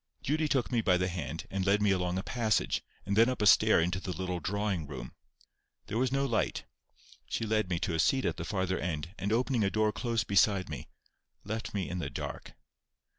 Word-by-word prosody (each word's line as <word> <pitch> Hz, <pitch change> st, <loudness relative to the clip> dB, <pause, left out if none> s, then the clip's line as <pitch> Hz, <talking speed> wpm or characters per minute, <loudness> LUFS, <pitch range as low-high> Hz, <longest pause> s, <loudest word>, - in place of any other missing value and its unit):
Judy 155 Hz, +3 st, +1 dB
took 130 Hz, -4 st, 0 dB
me 120 Hz, -2 st, +2 dB
by 90 Hz, -4 st, +3 dB
the 90 Hz, 0 st, 0 dB
hand, 80 Hz, -2 st, -5 dB
and 95 Hz, -1 st, -1 dB
led 100 Hz, +2 st, +3 dB
me 105 Hz, -1 st, +3 dB
along 90 Hz, -1 st, 0 dB
a 95 Hz, -, -2 dB
passage, 110 Hz, -4 st, 0 dB, 0.2 s
and 100 Hz, +1 st, -1 dB
then 115 Hz, +3 st, +6 dB
up 130 Hz, -, -2 dB
a 105 Hz, -, +1 dB
stair 100 Hz, -, +6 dB
into 90 Hz, +2 st, 0 dB
the 95 Hz, -, -7 dB
little 90 Hz, -1 st, -3 dB
drawing 100 Hz, -2 st, -2 dB
room. 65 Hz, -3 st, -7 dB, 0.7 s
There 110 Hz, -, -3 dB
was 130 Hz, 0 st, +1 dB
no 135 Hz, +1 st, +1 dB
light. 120 Hz, -4 st, -1 dB, 0.6 s
She 115 Hz, -, -1 dB
led 110 Hz, -3 st, +1 dB
me 85 Hz, -, 0 dB
to 85 Hz, -, -1 dB
a 80 Hz, -, -1 dB
seat 130 Hz, +10 st, +3 dB
at -, -, -1 dB
the -, -, -4 dB
farther 95 Hz, -3 st, -1 dB
end, 85 Hz, 0 st, -3 dB
and 100 Hz, -, -2 dB
opening 120 Hz, 0 st, +2 dB
a 100 Hz, -, +2 dB
door 110 Hz, +1 st, +2 dB
close 115 Hz, -1 st, -1 dB
beside 100 Hz, -2 st, +3 dB
me, 70 Hz, -6 st, -6 dB, 0.6 s
left 110 Hz, +1 st, -4 dB
me 95 Hz, -3 st, -1 dB
in 90 Hz, -, -4 dB
the 70 Hz, -5 st, -3 dB
dark. 70 Hz, -, -6 dB
100 Hz, 220 wpm, -31 LUFS, 90-110 Hz, 0.7 s, then